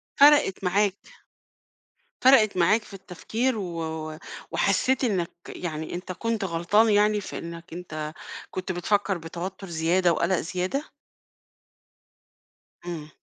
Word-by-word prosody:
فرقت 285 -10 +5
معاك. 195 +1 +2 1.2
فرقت 225 -7 +6
معاك 185 +6 +4
في 210 - -13
التفكير 220 +6 -2
و 160 -4 -4 0.3
وحسّيت 265 0 +2
إنّك 190 -8 0 0.2
يعني 160 -2 -5
أنت 180 +1 -5
كنت 225 +2 -2
غلطان 185 +6 +3
يعني 210 0 +3
في 195 - -6
إنّك 170 +1 -9
أنت 155 -3 -5 0.4
كنت 185 0 -3
بتفكّر 195 +2 0
بتوتّر 180 +4 -6
زيادة 170 +2 +2
وقلق 185 +3 +1
زيادة؟ 185 - -3 1.9
إمم. 160 -4 -6
185 Hz, 110 wpm, -26 LUFS, 170-210 Hz, 1.9 s, فرقت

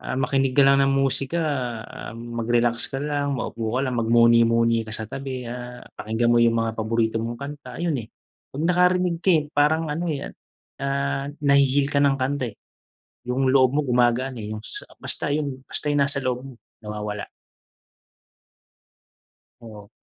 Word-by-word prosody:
Ah, - - -4
makinig 135 0 +1
ka 140 - +7
lang 140 0 +5
ng 135 0 +2
musika, 135 +4 +1 0.7
mag-relax 120 +1 0
ka 135 - -2
lang, 145 -1 -1
maupo 115 -2 -4
ka - - +1
lang, 125 -1 -2
mag 115 - 0
muni-muni 115 -1 +4
ka 110 - -8
sa 110 - -1
tabi, 135 -2 -5
ah, 125 0 -8 0.2
pakinggan 115 +2 0
mo 120 - +4
yung 115 -1 +4
mga 115 0 0
paborito 110 0 0
mong 115 +1 -4
kanta 140 -3 -8
ayun, 165 -4 0
eh. - - -31 0.5
Pag 145 - -3
nakarinig 180 -1 +2
ka, 190 - +3
eh, 155 - +3
parang 155 +2 +2
ano, 165 +4 -2
eh, 140 - -5 0.5
ah, 140 0 -1
nahi-heal 140 -2 +2
ka 140 - +1
ng 140 -1 +4
kanta, 140 +3 -1
eh. - - -49 0.7
Yung 130 +2 +1
loob 130 -1 +4
mo - - +4
gumagaan, 125 +1 +1
eh, 105 -1 -5
yung 110 - -5
sa - - -2 0.2
basta - - +1
yung, 140 -3 -3
basta 150 - -1
yung 145 - +2
nasa 140 0 +1
loob 125 0 -2
mo 135 - -9 0.3
nawawala. 105 0 -5 2.3
Oo. 105 -3 -12
130 Hz, 170 wpm, -23 LUFS, 115-140 Hz, 2.3 s, ka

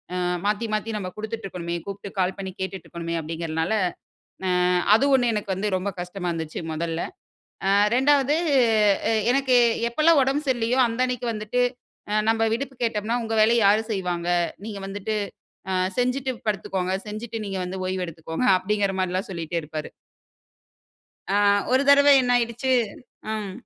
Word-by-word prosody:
அ - - -1 0.3
மாத்தி 210 +2 0
மாத்தி 215 +1 -1
நம்ப 190 -3 -4
குடுத்துட்ருக்கனுமே. 195 -6 -5
கூப்ட்டு 200 0 -7
கால் 185 0 +2
பண்ணி 190 -1 -5
கேட்டுட்டு 190 -2 -5
இருக்கணுமே 170 -1 -5
அப்டிங்க்ரனால 160 +3 -2 0.7
ஆ - - +1 0.5
அது 230 - +3
1 245 -2 +2
எனக்கு 205 -2 -2
வந்து 200 +3 -2
ரொம்ப 185 +2 -2
கஷ்டமா 180 0 -4
இருந்துச்சு 160 -2 -4
மொதல்ல. 165 +1 -3 0.7
ஆ - - +3 0.3
2வது 280 +2 +3 1.0
எனக்கு, 265 -1 +2 0.3
எப்பல்லாம் 305 +5 +4
உடம்பு 275 +3 -1
சரில்லையோ 245 0 +1
அந்த 230 +1 -5
அன்னைக்கு 250 -1 -3
வந்துட்டு 215 +3 -1 0.5
அ - - 0 0.2
நம்ம 225 0 +2
விடுப்பு 265 +3 -4
கேட்டோம்னா 225 +1 0
உங்க 225 0 -2
வேலைய 230 +2 +4
யாரு 210 +2 +4
செய்வாங்க? 180 -4 -2 0.4
நீங்க 210 -2 -6
வந்துட்டு 205 +2 -3 0.6
அ - - 0 0.3
செஞ்சிட்டு 255 +2 0 0.2
படுத்துகொங்க. 190 -2 -2 0.2
செஞ்சிட்டு 225 +2 -5
நீங்க 195 -1 -3
வந்து 185 +1 -5
ஓய்வு 185 -1 -2
எடுத்துக்கோங்க 160 +8 -3
அப்டிங்கற 200 +1 0
மாரில்லாம் 185 +2 -1
சொல்லிட்டேருப்பாரு. 160 -3 -4 1.4
ஆ - - +4 0.3
ஒரு 260 +1 +4
தடவ 285 0 +7
என்ன 245 -1 0
ஆயிடுச்சு. 240 +2 -1 0.6
ம். 210 -3 -4
210 Hz, 140 wpm, -24 LUFS, 185-240 Hz, 1.4 s, தடவ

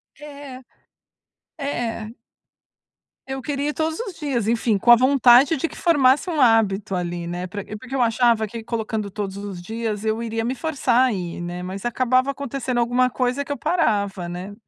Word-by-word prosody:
É, 285 -3 -10 1.0
é. 235 -6 -3 1.2
Eu 265 0 -5
queria 290 0 -2
ir 300 - -2
todos 320 +2 -2
os 420 -6 -5
dias, 265 -8 -2
enfim, 225 -2 +1
com 230 +5 -1
a - - +11
vontade 260 +3 +5
de 330 - -1
que - - -12
formasse 290 -1 +3
um 315 -4 -2
hábito 215 -5 +3
ali, 175 -1 -3
né, 175 +1 -4
para 195 +2 -6
porque 255 +4 -11
eu 265 - +1
achava 230 -2 +2
que 230 +1 -8
colocando 220 -2 -3
todos 200 -1 -4
os 200 -3 -7
dias 220 +1 -4
eu 220 +1 0
iria 225 0 -2
me 255 +3 -1
forçar 265 -5 +1
a - - -1
ir, 175 -2 -5
né, 175 +1 -5
mas 190 +2 -6
acabava 255 +2 +2
acontecendo 275 -2 -4
alguma 245 +2 +2
coisa 255 +2 -1
que 285 - -8
eu 285 - -2
parava, 205 - 0
né, 180 +3 -6
235 Hz, 180 wpm, -22 LUFS, 205-270 Hz, 1.2 s, a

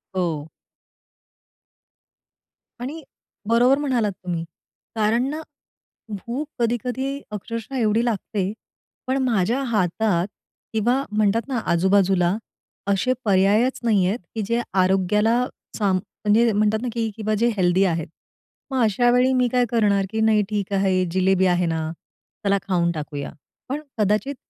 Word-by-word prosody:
हो. 160 -4 -2 2.3
आणि 300 +5 -5 0.4
बरोबर 245 +4 +4
म्हणालात 250 -8 0
तुम्ही, 175 -3 -4 0.5
कारण 225 +4 +2
ना, 310 +2 -4 0.7
भूक 235 +9 -4
कधी-कधी 250 +4 -1
अक्षरशः 230 +5 -5
एवढी 225 0 +2
लागते, 205 -3 -1 0.6
पण 265 +1 +1
माझ्या 235 +2 +1
हातात 205 -4 +1 0.5
किंवा 240 +5 +1
म्हणतात 215 +3 +1
ना, 260 -3 -2
आजूबाजूला 190 0 +3 0.5
असे 200 +6 +2
पर्यायच 205 +6 +3
नाहीयेत, 205 -1 +2 0.2
की 220 - -1
जे 235 +3 0 0.2
आरोग्याला 210 +6 +2 0.3
सांब 195 -4 +2 0.3
म्हणजे 225 +2 +4
म्हणतात 215 +1 +2
ना, 250 - -3
की 225 -2 -1
किंवा 215 0 -1
जे 235 - +3
हेल्दी 185 +1 +3
आहेत. 165 -3 -1 0.6
मग 260 -2 +1
अशावेळी 245 +4 +3
मी 250 -1 +3
काय 250 -1 +3
करणार 205 -4 +2
की 220 0 -2
नाही, 220 -1 +4
ठीक 200 -2 -2
आहे, 190 -1 +2
जिलेबी 190 0 +3
आहे 180 -1 +2
ना, 160 -1 -2 0.5
चला 200 0 +3
खाऊन 170 -2 +2
टाकूया. 145 -2 -5 0.4
पण 290 +3 -2 0.2
कदाचित 215 +7 +1
210 Hz, 125 wpm, -23 LUFS, 190-240 Hz, 2.3 s, बरोबर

